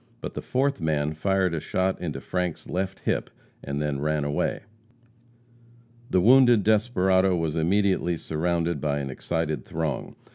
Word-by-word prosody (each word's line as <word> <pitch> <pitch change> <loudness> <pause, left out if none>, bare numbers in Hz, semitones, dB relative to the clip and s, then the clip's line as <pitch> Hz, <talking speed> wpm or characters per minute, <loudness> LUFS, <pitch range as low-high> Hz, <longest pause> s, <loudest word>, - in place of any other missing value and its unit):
But - - -6
the - - -5
fourth 135 -3 0
man 75 -1 0
fired 95 +2 +1
a 80 - -1
shot 95 +4 -1
into 75 -6 -3
Frank's 90 -2 -3
left 95 +1 -3
hip, - - -1 0.3
and 70 0 -3
then 75 -2 -1
ran 75 0 0
away. 75 0 -1 1.5
The 95 - +3
wounded 120 0 +6
desperado 95 -4 +3
was 80 -2 -1
immediately 90 0 +1
surrounded 85 -1 -1
by 75 -2 0
an 70 -2 -3
excited 80 +3 -2
throng. 80 -3 -3
85 Hz, 145 wpm, -26 LUFS, 75-95 Hz, 1.5 s, wounded